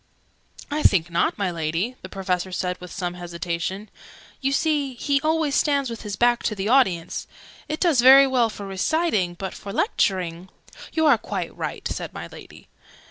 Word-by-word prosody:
"I 300 +1 0
think 175 - +3
not, 170 - +1
my 195 -3 -1
Lady?" 170 +8 -2
the - - -9
Professor 185 -1 -2
said 180 0 -3
with 180 - -9
some 180 -2 -3
hesitation. 175 +3 -4 0.5
"You 270 0 +1
see, 285 -3 0
he 280 +3 0
always 315 -1 +1
stands 280 -4 +1
with 230 - -6
his 205 -2 -5
back 240 +3 +3
to 215 - 0
the 195 0 -3
audience. 215 -10 +2 0.4
It 310 - -2
does 320 -9 +3
very 270 +2 +9
well 250 -4 +2
for 205 -2 -8
reciting; 195 - 0
but 190 +1 -5
for 200 - -8
lecturing 185 - 0 0.2
" - - -14
"You 320 -1 +2
are 280 -7 +5
quite - - -5
right," - - -4
said - - -5
my - - -6
Lady. - - -13
205 Hz, 180 wpm, -23 LUFS, 180-275 Hz, 0.5 s, very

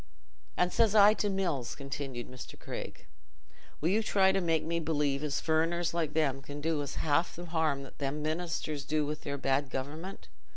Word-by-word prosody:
"And 180 0 +2
says 220 -2 +3
I 210 0 +8
to 210 -1 0
Mills," 170 -11 -1
continued 135 -3 -5
Mr. 125 0 -9
Craig, - - -7 0.7
"'Will 160 - +1
you 210 +4 +3
try 195 -3 +4
to 195 0 +1
make 165 -3 +1
me 170 +1 -1
believe 150 -3 0
as 150 -1 0
furriners 165 +2 +1
like 165 -3 -1
them 140 -4 +1
can 145 +2 -7
do 155 0 0
us 145 - -5
half 155 +3 +1
th' 175 0 -8
harm 155 -5 0
them 145 +1 -2
ministers 155 -2 -2
do 150 +1 0
with 150 +1 -4
their 140 -3 -3
bad 135 0 +1
government? 150 +9 -5
155 Hz, 180 wpm, -31 LUFS, 140-170 Hz, 0.7 s, I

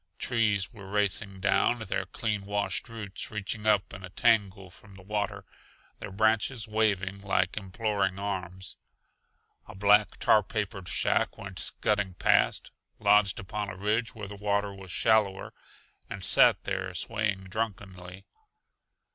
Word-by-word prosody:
Trees 105 -5 0
were 100 -4 -11
racing 100 -1 -1
down, 105 +4 +3
their 110 -4 -3
clean 105 -2 -2
washed 100 +4 -2
roots 110 -4 -4
reaching 105 +1 -4
up 105 -2 +2
in 95 -1 -9
a 90 - -7
tangle 100 -2 +1
from 100 +1 -15
the 95 - -14
water, 105 +1 -3 0.5
their - - -7
branches 110 +3 +1
waving 100 -3 0
like 95 -2 0
imploring 100 -1 -1
arms. 95 -1 -4 0.9
A 105 - -11
black, 105 +2 +4
tar 110 - +4
papered 100 -2 -4
shack - - +1
went - - -7
scudding 105 -3 0
past, - - +2 0.3
lodged 100 -1 +3
upon 105 +2 -4
a 90 - -7
ridge 110 +4 0
where 105 -2 -6
the 100 - -8
water 100 0 -1
was 95 -1 -11
shallower, 105 -3 +1 0.6
and - - -3
sat - - +5
there - - -3
swaying 105 -4 -1
drunkenly. 95 -2 -5
100 Hz, 140 wpm, -28 LUFS, 95-105 Hz, 0.9 s, sat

